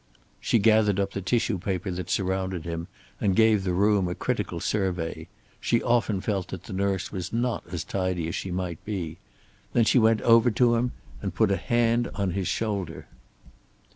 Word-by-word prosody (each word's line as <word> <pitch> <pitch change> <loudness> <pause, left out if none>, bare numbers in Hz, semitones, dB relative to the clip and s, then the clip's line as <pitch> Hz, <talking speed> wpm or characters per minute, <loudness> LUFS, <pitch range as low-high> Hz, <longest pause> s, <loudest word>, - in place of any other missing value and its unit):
She - - +2
gathered 105 -2 +4
up 100 0 0
the 100 - -3
tissue 110 0 0
paper 95 +1 -2
that 90 -1 -5
surrounded 95 -2 -1
him, 85 0 -4 0.3
and 95 -3 +1
gave 110 -2 +4
the 95 - 0
room 100 +1 +3
a 90 - -3
critical - - -2
survey. 90 -5 -2 0.3
She 115 - +1
often 115 -5 +1
felt 95 -4 -1
that 95 - -7
the 110 - -8
nurse 95 -1 -1
was 95 -2 -4
not 120 -1 -1
as 85 -3 -3
tidy 90 -3 -2
as 85 - -4
she 95 - -3
might 90 -2 -4
be. 85 -6 -4 0.5
Then 115 - +4
she 125 - +4
went 110 -1 +4
over 115 +1 +5
to 120 +1 +3
him 120 +1 0 0.3
and 95 -3 -4
put 110 -3 +3
a - - +3
hand 120 +5 +1
on 100 -2 0
his 95 0 -2
shoulder. 100 -7 -2
100 Hz, 185 wpm, -26 LUFS, 90-110 Hz, 0.5 s, over